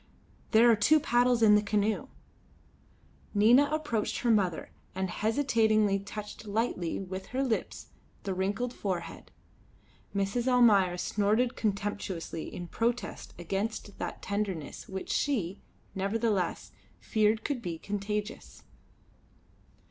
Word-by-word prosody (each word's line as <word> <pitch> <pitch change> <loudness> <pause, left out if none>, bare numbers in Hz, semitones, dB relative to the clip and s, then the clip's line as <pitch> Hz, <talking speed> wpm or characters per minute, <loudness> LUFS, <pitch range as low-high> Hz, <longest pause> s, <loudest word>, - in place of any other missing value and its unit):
There 230 +1 +6
are - - +5
two 290 +9 +4
paddles 245 -3 +2
in 210 -1 +7
the 210 - +5
canoe." 210 +1 0 1.3
Nina 240 +8 +6
approached 295 -9 -1
her 240 - +2
mother 190 -6 +1 0.2
and 190 -1 -2
hesitatingly 220 -4 +2
touched 210 +2 -8
lightly 205 -5 -1
with 190 0 -6
her 260 +2 -1
lips 235 -5 -3 0.3
the 195 - -2
wrinkled 205 +7 -1
forehead. 185 -7 -4 0.9
Mrs. 200 +5 0
Almayer 210 -8 +5
snorted 215 +7 +1
contemptuously 200 -5 -3
in 175 -1 -6
protest 235 +6 -2
against 195 +3 -4
that - - -5
tenderness 200 -7 -3
which 190 -1 -5
she, 205 -10 -1 0.3
nevertheless, 200 -1 -1 0.3
feared 215 0 +1
could 280 -5 -2
be 170 -5 -4
contagious. 205 +3 -5
210 Hz, 110 wpm, -29 LUFS, 195-235 Hz, 1.3 s, in